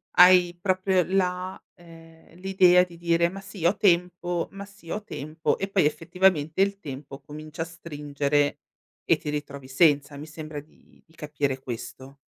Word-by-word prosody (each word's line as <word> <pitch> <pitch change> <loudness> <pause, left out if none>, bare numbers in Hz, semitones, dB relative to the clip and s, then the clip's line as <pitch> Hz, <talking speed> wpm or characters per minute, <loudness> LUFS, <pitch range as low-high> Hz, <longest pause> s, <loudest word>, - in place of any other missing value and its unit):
Hai 180 -1 +7
proprio 185 -1 +1
la 185 0 -1
ehm, 165 -1 -17
l'idea 185 -2 +5
di 175 -2 -10
dire: 170 0 +2
"Ma 195 +1 -8
sì 195 -4 -7
ho 180 - +3
tempo, 175 -2 +1
ma 200 0 -8
sì 195 -4 -17
ho 210 +3 -3
tempo", 155 -2 -3
e 195 - -2
poi 190 -6 +2
effettivamente 165 +1 +1
il 200 0 +1
tempo 140 -2 -8
comincia 155 +2 -9
a - - -1
stringere, 145 -3 -1 0.5
e - - +4
ti 150 - -6
ritrovi 140 -2 -5
senza, 145 0 +2
mi 150 - -8
sembra 155 -1 -7
di 150 - -21
di 160 - -25
capire 145 -3 -2
questo. 130 +2 -8
165 Hz, 160 wpm, -26 LUFS, 150-185 Hz, 0.5 s, Hai